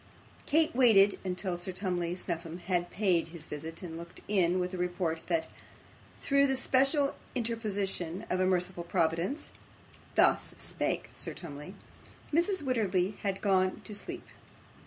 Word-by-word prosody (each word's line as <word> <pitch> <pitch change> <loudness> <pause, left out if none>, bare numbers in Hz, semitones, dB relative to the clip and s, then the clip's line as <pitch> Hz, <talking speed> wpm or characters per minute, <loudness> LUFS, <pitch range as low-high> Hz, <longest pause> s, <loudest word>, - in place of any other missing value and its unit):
Kate 310 -2 +3
waited 210 -6 +6
until 185 0 -2
Sir 175 +2 -4
Tumley 180 -2 -1
Snuffim 170 -2 -4
had 175 -1 0
paid 185 -5 +2
his 165 -1 -7
visit 160 +4 -6
and 165 -2 -6
looked 170 - -9
in 185 -3 +3
with 180 +1 -2
a - - -3
report, 175 -2 -1
that, 325 -1 +1 0.7
through 280 0 +3
the 270 - +1
special 275 +2 +3 0.2
interposition 205 -7 -2
of 185 - 0
a 185 - +3
merciful 180 -1 0
Providence 170 - 0 0.6
(thus - - +3
spake - - -2
Sir - - -4
Tumley), 150 +2 -8 0.6
Mrs. 345 +1 +2
Wititterly 205 -7 +1
had 195 -1 -2
gone 185 -2 +2
to 210 - -9
sleep. 205 - -5
185 Hz, 140 wpm, -31 LUFS, 175-220 Hz, 0.7 s, waited